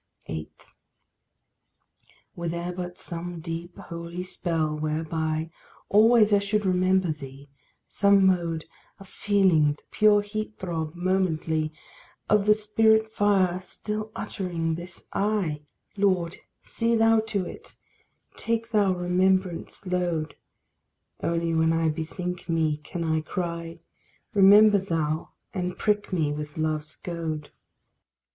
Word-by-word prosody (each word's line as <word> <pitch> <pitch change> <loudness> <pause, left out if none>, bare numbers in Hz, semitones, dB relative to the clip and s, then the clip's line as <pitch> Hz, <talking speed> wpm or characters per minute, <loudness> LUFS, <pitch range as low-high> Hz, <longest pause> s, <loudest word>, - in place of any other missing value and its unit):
8. 80 -1 -5 1.9
Were 170 0 -4
there 170 +1 -3
but 180 0 -6
some 170 0 -6
deep, 165 +2 -6
holy 170 +1 -6
spell, 165 -4 -1
whereby 155 +1 -2 0.4
Always 215 0 +5
I 205 - +6
should 205 +1 -1
remember 185 -1 +2
thee 140 -1 -9 0.4
some 200 -1 +4
mode 170 -4 +1 0.3
Of 195 - -13
feeling 185 -8 +3
the 145 - -20
pure 210 -1 +4
heat 215 +1 -5
throb 165 -3 -4
momently 165 -4 0 0.6
Of 210 -1 +3
the 210 - +7
spirit 220 +1 +3
fire 195 -4 +2
still 215 +3 -5
uttering 170 -4 -3
this 175 +1 -7
I! 195 -8 0 0.3
Lord, 185 -4 +1 0.2
see 230 0 0
thou 225 0 +5
to 200 -4 -1
it, - - -10 0.6
take 230 0 -2
thou 205 -4 +3
remembrance' 185 +1 0
load: 175 -4 -1 0.9
Only 170 0 0
when 160 0 +3
I 165 0 +2
bethink 175 +3 -4
me 160 -2 +1
can 170 +3 -6
I 160 -1 +1
cry; 170 0 -4 0.6
Remember 205 +1 +7
thou, 160 -4 -2 0.2
and 180 -2 -3
prick 210 -1 0
me 160 -5 +1
with 150 +1 -6
love's 155 -1 -2
goad. 160 -4 -5
175 Hz, 120 wpm, -26 LUFS, 160-200 Hz, 1.9 s, the